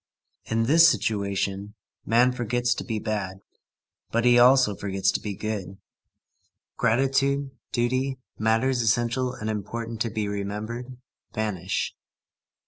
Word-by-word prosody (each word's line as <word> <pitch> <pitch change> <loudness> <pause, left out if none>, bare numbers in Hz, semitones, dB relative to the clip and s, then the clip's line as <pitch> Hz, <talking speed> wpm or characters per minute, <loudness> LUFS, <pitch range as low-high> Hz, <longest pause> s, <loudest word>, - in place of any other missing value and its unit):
In 115 0 0
this 165 +7 +7
situation, 100 -1 -1 0.3
man 120 +3 +4
forgets 120 0 0
to - - -5
be 115 -3 -3
bad, 100 -3 -3 0.7
but 115 +1 0
he 120 0 +6
also 125 -4 +5
forgets 95 -1 0
to - - -1
be 105 -2 -5
good. 95 -3 -4 1.0
Gratitude, 135 +3 +1 0.2
duty, 130 +2 0 0.2
matters 115 +4 +2
essential 120 +3 +1
and 110 - -6
important 110 +2 -4
to 115 - +1
be 105 -1 -2
remembered, 105 +5 -5 0.4
vanish. 100 -4 -2
115 Hz, 120 wpm, -25 LUFS, 105-125 Hz, 1.0 s, this